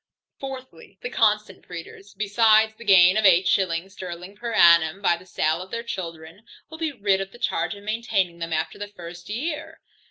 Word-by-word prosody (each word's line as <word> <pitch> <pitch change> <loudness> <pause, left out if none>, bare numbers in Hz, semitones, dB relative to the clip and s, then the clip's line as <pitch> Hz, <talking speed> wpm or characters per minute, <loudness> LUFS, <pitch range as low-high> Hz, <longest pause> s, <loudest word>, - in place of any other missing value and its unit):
Fourthly, 260 -9 -9
The 245 - -4
constant 210 -4 0
breeders, 180 +4 -10
besides 220 +1 +3
the 225 - -13
gain 190 -2 +6
of 215 - +2
eight 185 -1 +5
shillings 185 0 0
sterling 180 +1 -8
per 235 +3 -5
annum 170 -4 +5
by 175 -4 +2
the 180 +2 -15
sale 160 -1 0
of 185 - -9
their 230 +3 -4
children, 165 -3 -7 0.3
will 320 - -9
be 320 -2 -1
rid 200 -6 0
of 195 0 -6
the - - -14
charge 240 - -2
of 200 - -13
maintaining 210 -5 -1
them 165 0 -5
after 160 0 -2
the 205 - -5
first 175 -2 -11
year. 300 +8 -5
195 Hz, 190 wpm, -24 LUFS, 175-220 Hz, 0.3 s, gain